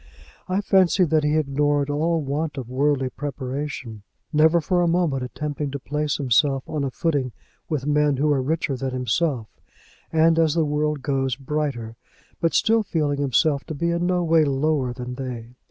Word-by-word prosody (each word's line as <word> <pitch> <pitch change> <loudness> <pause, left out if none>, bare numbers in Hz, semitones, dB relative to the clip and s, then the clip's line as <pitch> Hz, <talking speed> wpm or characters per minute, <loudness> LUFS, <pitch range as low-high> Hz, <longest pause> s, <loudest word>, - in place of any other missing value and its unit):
I 185 +2 0
fancy 190 -2 +3
that 155 -2 +2
he 150 +1 +2
ignored 145 -1 +1
all 160 +2 0
want 145 +2 -3
of 130 -3 -5
worldly 135 -1 +1
preparation, 135 -4 -5 0.3
never 160 +3 +5
for 175 +2 +1
a 175 - +2
moment 165 -6 +1
attempting 145 +3 -4
to 140 +1 -5
place 150 +2 -2
himself 135 +1 +2
on 150 -2 -2
a 135 - -1
footing 140 -5 -1 0.4
with 150 -5 -2
men 150 -1 +2
who 150 +3 +1
were 140 -3 +2
richer 150 0 -1
than 130 0 -3
himself, 125 0 -1 0.6
and, 160 +1 +4
as 160 -1 +3
the 165 -2 +2
world 150 -1 -1
goes, 135 -3 0
brighter, 135 -5 -3 0.4
but 165 - +1
still 225 +1 +3
feeling 150 -8 -1
himself 140 +1 +2
to 155 - -6
be 170 +4 0
in 170 +1 0
no 180 -1 +1
way 165 -1 +4
lower 140 -2 0
than 125 0 -6
they. 125 -3 -6
145 Hz, 175 wpm, -23 LUFS, 135-160 Hz, 0.6 s, never